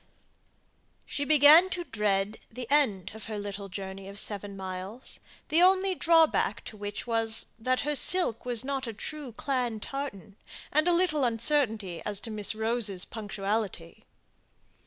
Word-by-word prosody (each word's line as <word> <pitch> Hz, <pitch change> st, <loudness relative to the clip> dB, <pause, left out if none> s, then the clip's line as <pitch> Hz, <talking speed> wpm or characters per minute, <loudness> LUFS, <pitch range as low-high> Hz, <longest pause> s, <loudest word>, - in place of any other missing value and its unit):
She 285 Hz, -, -2 dB
began 310 Hz, +5 st, +7 dB
to 360 Hz, -1 st, -3 dB
dread 210 Hz, -5 st, -1 dB
the 245 Hz, +2 st, -7 dB
end 210 Hz, -11 st, +2 dB
of 220 Hz, -, -8 dB
her 215 Hz, -1 st, -5 dB
little 200 Hz, -1 st, -6 dB
journey 190 Hz, +1 st, -7 dB
of 200 Hz, +1 st, -10 dB
seven 205 Hz, -2 st, -2 dB
miles; 190 Hz, +5 st, -6 dB, 0.3 s
the 320 Hz, +3 st, +4 dB
only 375 Hz, +1 st, +4 dB
drawback 330 Hz, -2 st, +3 dB
to -, -, -8 dB
which 205 Hz, 0 st, -6 dB
was, 225 Hz, -2 st, 0 dB
that 255 Hz, +3 st, 0 dB
her 295 Hz, -, -1 dB
silk 290 Hz, -, +3 dB
was 245 Hz, 0 st, -1 dB
not 270 Hz, -2 st, -2 dB
a 230 Hz, -, -4 dB
true 290 Hz, +4 st, -6 dB
clan 245 Hz, -2 st, -2 dB
tartan, 210 Hz, -7 st, -6 dB, 0.3 s
and 305 Hz, +3 st, +3 dB
a -, -, +5 dB
little 340 Hz, -5 st, +2 dB
uncertainty 225 Hz, -, +1 dB
as 205 Hz, -2 st, -2 dB
to 230 Hz, -, -6 dB
Miss 215 Hz, 0 st, -2 dB
Rose's 220 Hz, -4 st, -1 dB
punctuality. 205 Hz, -, -4 dB
225 Hz, 150 wpm, -28 LUFS, 205-285 Hz, 0.3 s, began